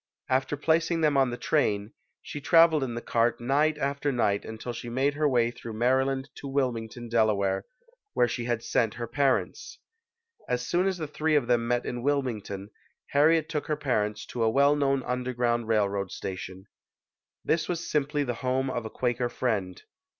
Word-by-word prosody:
After 130 +2 +1
placing 165 +2 +1
them 150 -2 +3
on 135 -2 +4
the 120 - -4
train, 105 -9 0 0.3
she 145 - -7
traveled 165 0 +5
in 120 -3 -3
the 120 - -5
cart 115 0 +1
night 145 +5 +2
after 140 0 -1
night 105 -5 +1
until 110 +2 -6
she 120 +1 -7
made 135 +4 +1
her 150 0 +1
way 120 -3 +2
through 115 -1 -8
Maryland 130 +3 +1
to 140 - -7
Wilmington, 120 -4 -2
Delaware, 100 -4 +1 0.5
where 120 - +3
she 120 0 -3
had 120 -2 -1
sent 115 -3 +1
her 120 - -4
parents. 140 - -1 0.7
As 125 0 -1
soon 180 +6 +1
as 190 -2 0
the 160 - -3
three 155 +1 0
of 145 -4 +3
them 120 -1 +1
met 120 0 0
in 120 - -4
Wilming 130 -5 0
ton, 100 +1 -7 0.4
Harriet 155 +2 +4
took 155 -3 -3
her 150 - 0
parents 105 -7 -1
to 120 - -5
a 115 - +4
well 140 +5 +4
known 135 -2 +1
un 125 +1 -2
derground 120 -2 0
railroad 100 -3 +1
station. 95 0 -6 0.8
This 165 0 +1
was 175 -1 -2
simply 145 0 0
the 125 -3 -2
home 130 +1 0
of 120 -2 -3
a - - -4
Quaker 120 +1 -1
friend. 100 -9 -2
125 Hz, 185 wpm, -27 LUFS, 115-145 Hz, 0.8 s, traveled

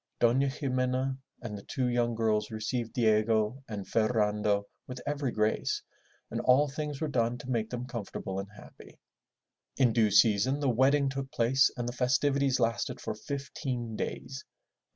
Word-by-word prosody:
Dona 125 +4 +4
Ximena 130 -1 -1 0.3
and 110 -3 -5
the 100 - -7
two 130 +4 -2
young 120 -1 +1
girls 110 -1 +1
received 115 +2 -3
Diego 110 +2 +2
and 100 -3 -5
Ferrando 105 -2 +1 0.2
with 125 0 -6
every 145 -3 -1
grace, 110 0 0 0.5
and - - -2
all 135 +4 +5
things 145 0 -4
were 155 - -1
done 120 -3 0
to 125 +1 -10
make 110 -2 0
them 125 0 -4
comfortable 100 -5 -5
and 100 0 -6
happy. 105 - -15 0.8
In 125 -4 +4
due 110 -2 +4
season 110 +6 +4
the 140 -2 +1
wedding 135 +4 +3
took 135 0 -4
place 135 -1 +3
and 120 -1 -2
the 120 - -3
festivities 135 +2 +2
lasted 115 +1 0
for - - -4
fifteen 130 -4 -4
days. 130 +4 -5
120 Hz, 155 wpm, -30 LUFS, 110-135 Hz, 0.8 s, all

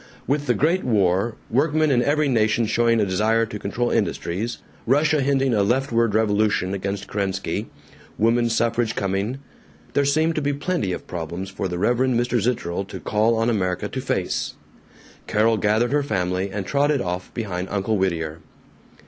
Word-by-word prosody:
With 145 +1 -1
the 120 - +3
great 165 - +2
war, 100 0 +1 0.2
workmen 155 +4 +2
in 120 -2 +3
every 145 +4 +2
nation 115 -2 +2
showing 115 +1 +2
a 105 - +3
desire 110 +4 +2
to 105 -1 -7
control 120 +5 -1
industries, 110 0 -1 0.3
Russia 150 +3 +3
hinting 135 -1 +2
a 105 - +3
leftward 115 -1 +1
revolution 105 -3 +1
against 100 +1 -3
Kerensky, 95 -1 -2 0.5
woman 115 +2 +2
suffrage 115 0 0
coming, 100 +6 -1 0.6
there 140 - +3
seemed 155 +4 +2
to 155 - -1
be 145 0 0
plenty 145 - -1
of - - -5
problems 90 +3 -5
for 95 0 -3
the 90 -1 -4
Reverend 125 +5 +2
Mr. 120 0 +1
Zitterel 100 -6 -1
to - - -7
call 110 +2 +1
on 115 +1 +1
America 95 -6 0
to - - -4
face. - - -2 0.7
Carol 110 +1 +2
gathered 110 +4 +1
her 145 +1 +2
family 95 -7 -1
and 100 0 -4
trotted 145 +4 +2
off 90 -3 -4
behind 95 -5 -3
Uncle 105 +2 0
Whittier. 85 -5 -1
115 Hz, 165 wpm, -23 LUFS, 95-130 Hz, 0.7 s, the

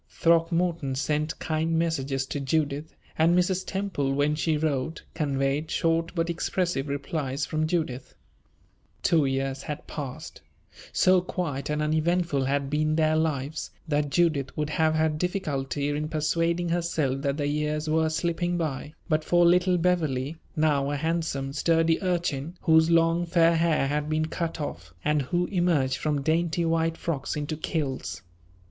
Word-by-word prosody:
Throckmorton 165 -3 +1
sent 150 +3 -1
kind 160 +1 -1
messages 140 -5 0
to 145 - -4
Judith; 145 +2 -1 0.2
and 170 +2 +5
Mrs. 180 +1 +1
Temple, 185 -9 -2
when 145 +1 +2
she 155 0 0
wrote, 150 0 -2
conveyed 140 +1 -1
short 165 +1 0
but 165 -1 0
expressive 170 -3 -1
replies 140 0 -2
from 155 +2 -1
Judith. 155 -7 -2 0.9
Two 160 -4 +3
years 135 0 -1
had 150 -2 -6
passed. 140 -4 -7 0.5
So 185 0 +4
quiet 150 -7 -3
and 150 0 0
uneventful 155 -2 +1
had 140 +1 0
been 155 +2 +1
their 155 0 +3
lives, 155 -2 -1 0.2
that 145 -1 0
Judith 145 -4 +1
would 150 0 -1
have 155 0 +2
had 155 -1 +1
difficulty 145 -6 -1
in 150 +1 -2
persuading 165 +2 0
herself 165 -6 0
that 140 0 -1
the 145 - -1
years 150 +1 -1
were 160 +1 +2
slipping 175 +2 -1
by, 150 -2 -3
but 155 -2 +1
for 175 +2 +4
little 180 +1 +4
Beverley, 160 -5 0 0.2
now 145 -3 +2
a 145 - -1
handsome, 150 -3 -2
sturdy 165 +1 +2
urchin, 175 -4 -1
whose 160 -1 +5
long, 165 +1 +3
fair 170 -1 +4
hair 165 -3 +2
had 150 +2 -1
been 155 0 +1
cut 165 0 -3
off, 85 - -6
and 150 -1 +2
who 175 +6 0
emerged 165 -8 +1
from 145 -2 -1
dainty 165 +2 +1
white 165 0 +1
frocks 145 -5 -3
into 150 +1 -3
kilts. 145 - -3
155 Hz, 150 wpm, -26 LUFS, 145-165 Hz, 0.9 s, and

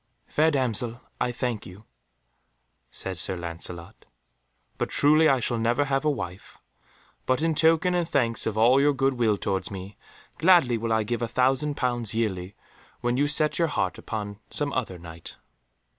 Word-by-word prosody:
"Fair 155 +2 +2
damsel, 120 -4 -1 0.2
I 125 - 0
thank 120 -3 -3
you," 95 +3 -13 1.1
said 95 -2 -5
Sir 95 - +1
Lancelot, 85 0 -7 0.7
"but - - -1
truly 155 +2 +4
I 135 - +3
shall 120 -1 -1
never 120 +5 +1
have 135 0 0
a 155 - +2
wife. 90 -10 -6 0.7
But 130 +4 +1
in 165 -1 +2
token 160 +3 +4
and 175 -2 0
thanks 120 -7 0
of 110 -1 -2
all 125 +5 +5
your 145 +1 +4
good 135 0 +1
will 115 -4 +1
towards 95 -2 -2
me, 95 +1 -8 0.4
gladly 165 -8 +5
will 115 0 -2
I 110 -1 +2
give 120 +3 -3
a 120 - 0
thousand 135 +5 +1
pounds 120 -4 -1
yearly 95 -4 -2 0.5
when 120 0 0
you 145 +3 +2
set 150 +2 +2
your 165 - +3
heart 125 -5 -2
upon 105 -2 -5
some 145 -1 -1
other 110 -8 -2
Knight." 85 -1 -10
120 Hz, 170 wpm, -26 LUFS, 105-145 Hz, 1.1 s, all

